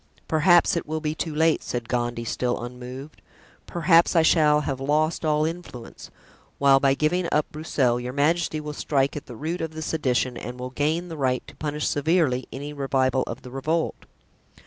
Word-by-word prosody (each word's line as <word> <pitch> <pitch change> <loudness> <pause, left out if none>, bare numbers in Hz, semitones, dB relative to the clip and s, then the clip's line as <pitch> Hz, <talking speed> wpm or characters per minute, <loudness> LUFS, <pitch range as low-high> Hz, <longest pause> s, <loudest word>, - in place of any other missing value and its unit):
"Perhaps 170 +2 +4
it 170 - -3
will 155 +1 -2
be 155 -1 -2
too 155 -1 -4
late," 160 +1 +3
said 120 -1 -4
Gondy, 120 -1 -2
still 120 +1 -1
unmoved; 125 +4 -9 0.5
"perhaps 170 0 +3
I 165 - +5
shall 150 -2 +4
have 135 -3 -3
lost 155 +5 0
all 155 -1 +2
influence; 165 -8 -7 0.5
while 140 -1 +5
by 135 0 +3
giving 170 +5 +1
up 150 0 +2
Broussel 135 -6 0
your 125 +1 -4
majesty 155 +3 +1
will 150 0 -6
strike 140 -2 0
at 150 - -7
the 120 - -9
root 160 +8 -3
of 160 -1 -4
the 160 - -5
sedition 130 -5 0
and 125 +3 -7
will 125 0 -5
gain 155 +6 -1
the 165 -2 -7
right 130 -3 0
to - - -14
punish 150 0 -3
severely 145 -4 +1
any 145 +2 -6
revival 135 -2 +1
of - - -6
the 125 - -10
revolt." 155 +5 -2
150 Hz, 185 wpm, -24 LUFS, 130-160 Hz, 0.5 s, I